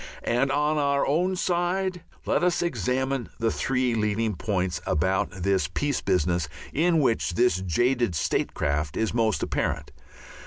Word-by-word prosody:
And, 130 +3 +1
on 150 +2 +1
our 140 -1 +2
own 180 +6 +1
side 180 +1 0 0.2
Let - - +1
us 175 -1 +2
examine 130 - -1
the 115 -1 +1
three 125 -2 0
leading 110 0 0
points 90 -1 -2
about 95 +5 +1
this 95 -3 0
peace 145 - -1
business 90 -4 0 0.2
in 165 +1 +3
which 115 -8 +1
this 115 -6 +2
jaded 120 +3 +1
statecraft 75 0 -1
is 110 - 0
most 110 -7 +1
apparent. - - -2
120 Hz, 140 wpm, -26 LUFS, 95-145 Hz, 0.2 s, in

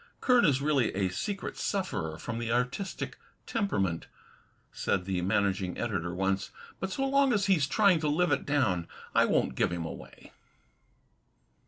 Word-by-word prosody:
"Kern 250 -4 +4
is 140 -3 +2
really 145 -5 +2
a 95 -1 +1
secret 195 - -4
sufferer 80 - -2
from 115 +4 -5
the 115 -1 -2
artistic 125 - -2 0.3
temperament," 100 - -1 0.6
said 90 -1 -1
the 95 -2 -1
managing 95 0 0
editor 95 -7 -2
once, 95 +2 -1 0.3
"but 190 - -2
so 270 +7 0
long 275 -1 +3
as 205 -2 +2
he's 170 -8 +3
trying 195 +1 +4
to 155 - -1
live 165 +3 +2
it - - +1
down, 110 - +1 0.3
I - - +5
won't - - +1
give - - +1
him 85 -2 -3
away." 80 - -10
125 Hz, 155 wpm, -29 LUFS, -, 0.6 s, I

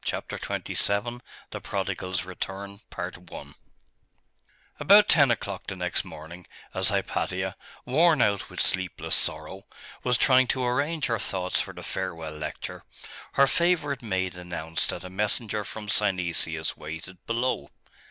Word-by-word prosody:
CHAPTER - - -3
XXVII: 120 +4 0 0.3
THE - - -5
PRODIGAL'S 90 -1 -2
RETURN 100 +2 -5 2.0
About 200 +8 +8
ten 145 -5 +6
o'clock 100 -4 -2
the 95 - -3
next 90 -1 -1
morning, 85 +3 -10 0.3
as - - +2
Hypatia, 95 0 -1 0.3
worn 155 +4 +5
out 100 -4 +2
with - - -7
sleepless 95 -2 0
sorrow, 80 +5 0 0.4
was 125 -1 +3
trying 130 0 +5
to 130 +1 +1
arrange 145 +6 +1
her 115 -2 0
thoughts 95 -2 -1
for - - -6
the - - -8
farewell 80 -2 -4
lecture, 75 0 -5 0.5
her 140 - +6
favourite 155 -3 +2
maid 95 -5 -1
announced 85 -2 -2
that - - -3
a 90 - -6
messenger 105 +2 -1
from 105 +2 -7
Synesius 85 -6 0
waited 80 +4 -8
below. 120 +2 0
100 Hz, 130 wpm, -27 LUFS, 90-125 Hz, 2.0 s, About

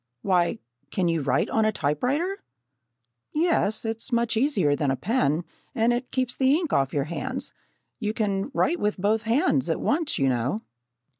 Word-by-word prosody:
"Why, 180 -3 +2 0.3
can 185 -3 0
you 165 -2 +1
write 135 -1 +1
on 220 - +2
a 215 - +3
typewriter?" 255 - -1 0.9
"Yes, 300 - +2
it's 225 +3 -3
much 235 -1 +1
easier 220 - +2
than 145 -1 0
a 135 - +2
pen, 170 - 0 0.3
and 230 0 +3
it 245 +1 -3
keeps 255 -2 -1
the 265 +1 +3
ink 330 -2 -1
off 135 0 +2
your 145 - 0
hands. 255 - -5 0.5
You 210 -3 -1
can 200 -1 -1
write 320 +5 +1
with 210 0 0
both 210 +3 +1
hands 285 +11 +2
at - - 0
once, 315 +1 0
you 135 - +2
know." 125 - 0
220 Hz, 170 wpm, -25 LUFS, 165-260 Hz, 0.9 s, a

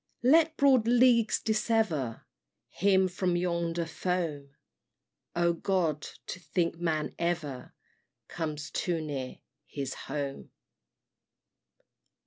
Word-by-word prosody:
Let 315 +4 +5
broad 265 -5 +4
leagues 240 -2 +4
dissever 215 - 0 0.4
Him 190 0 +3
from 180 -1 -1
yonder 170 -1 -1
foam 160 -3 -2 0.9
Oh, 170 0 +3
God! 170 -4 0 0.2
to 185 - -6
think 170 -2 -1
Man 160 -3 -1
ever 160 -7 -3 0.5
Comes 155 -3 -4
too 175 -3 -1
near 140 -5 -5 0.3
his 135 -2 -4 0.2
Home! 140 -2 -4
170 Hz, 95 wpm, -29 LUFS, 155-200 Hz, 0.9 s, Let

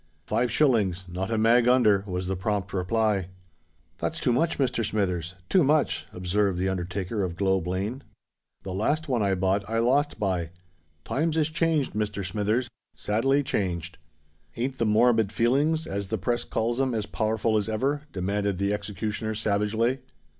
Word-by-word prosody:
"Five 120 0 0
shillings—not 95 - +1
a 115 - 0
mag 115 +2 +4
under," 110 -6 +4
was 90 -1 -3
the 95 +1 -1
prompt 100 0 -2
reply. 100 0 +1 0.7
"That's - - -2
too 125 - +1
much, 160 +7 +1
Mr. 125 -4 0
Smithers—too 95 - 0
much," 150 +2 +1
observed 95 +1 0
the 95 +1 0
undertaker 95 +3 -3
of 90 -3 -2
Globe 95 -2 +1
Lane. 100 +9 -2 0.6
"The 95 - -5
last 150 +11 0
one 125 -5 +1
I 100 -1 +2
bought 95 +2 +1
I 115 - 0
lost 135 +6 +2
by: 90 -5 -1 0.6
times 160 +3 0
is 155 0 +1
changed, 160 -3 +1
Mr. 105 -2 -2
Smithers—sadly 115 +5 -1
changed." 90 - -2 0.6
"Ain't 130 +3 -2
the 115 - +2
morbid 110 -1 +3
feelings, 140 +8 +2
as 100 0 -3
the 110 - -1
press 120 +1 -1
calls 120 +3 -1
'em, 130 -3 0
as 110 -2 -1
powerful 110 +1 0
as 105 0 0
ever?" 135 +7 0
demanded 100 +1 -1
the 100 +2 0
executioner 105 +2 -3
savagely. 110 +4 0
105 Hz, 155 wpm, -26 LUFS, 95-125 Hz, 0.7 s, mag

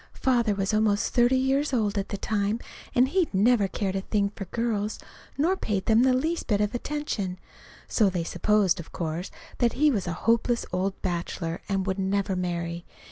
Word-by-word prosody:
Father 235 -5 +2
was 195 +1 -1
almost 215 -1 +2
thirty 245 +1 +4
years 270 +2 +1
old 215 -4 +1
at 200 -1 -2
that 200 - -5
time, 210 +1 0 0.4
and 255 +2 +4
he'd 365 +1 +1
never 210 +1 +4
cared 195 0 -2
a 195 - 0
thing 200 0 0
for 195 - -6
girls, 220 -1 -2 0.4
nor 335 +7 +2
paid 205 - -2
them 225 +1 +4
the 260 +1 +4
least 315 +7 -1
little 210 -1 +3
bit 205 - -5
of - - -19
attention. 240 -9 -3 0.5
So 215 -4 +3
they 180 -3 -2
supposed, 190 +2 +2
of 170 - -9
course, 170 +1 -3 0.3
that 240 -1 +3
he 300 +3 +3
was 200 -8 -1
a 175 - -1
hopeless 235 +1 +2
old 190 +2 -1
bachelor 170 -2 -3
and 195 -1 0
wouldn't 190 0 -1
ever 195 -1 0
marry. 170 -1 -3
205 Hz, 190 wpm, -26 LUFS, 190-240 Hz, 0.5 s, thirty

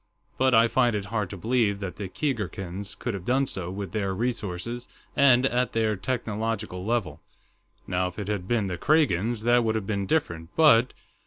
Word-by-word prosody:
But 130 -1 +4
I 115 +1 +6
find 120 -1 +2
it 100 -1 -2
hard 105 -4 0
to 100 - -7
believe 110 -1 +1
that 95 -2 -5
the 100 -3 -5
Keegarkans 100 - -4
could 120 - -3
have 95 -3 -5
done 130 +6 +2
so, 95 -8 -4
with 95 0 -5
their 100 -3 -1
resources 115 0 -3 0.3
and 130 -3 +5
at 125 -1 +1
their 110 -1 +1
technological 110 -2 -3
level. 115 -1 -1 0.6
Now, 90 0 0
if 90 - -9
it 105 -2 -4
had 100 -4 -2
been 115 -2 +1
the 90 -3 -4
Kragans, 120 - +2
that 120 +1 +4
would 110 -1 0
have 110 -3 -2
been 100 -1 -2
different, 85 - -1
but...." 130 -6 +5
110 Hz, 185 wpm, -26 LUFS, 95-120 Hz, 0.6 s, I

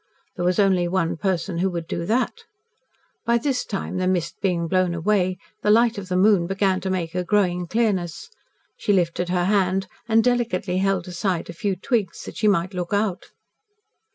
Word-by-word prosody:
There 175 - -3
was 180 0 +2
only 190 -3 +3
one 175 -2 0
person 180 -1 -1
who 190 +2 +2
would 170 -2 -4
do 170 +1 -4
that. 240 +3 +1 0.9
By 235 0 +3
this 255 +1 -1
time, 195 -2 -4
the 185 0 0
mist 175 -3 0
being 175 -4 0
blown 185 0 +1
away, 185 +1 +1 0.2
the 210 - +1
light 230 0 +4
of 190 -2 -9
the 180 - +1
moon 190 -3 +4
began 190 0 +1
to 190 - -3
make 175 -3 -2
a 180 0 -1
growing 180 -2 +1
clearness. 205 - -1 0.4
She 205 - 0
lifted 175 -1 0
her 180 -1 +1
hand 190 -1 +2 0.2
and 225 0 +4
delicately 220 -7 0
held 195 -2 0
aside 180 -1 -2
a - - -11
few 195 +3 -1
twigs 200 -2 -1
that - - -9
she 215 - +2
might 190 -2 +2
look 180 +1 -3
out. 200 -3 0
185 Hz, 185 wpm, -23 LUFS, 175-205 Hz, 0.9 s, light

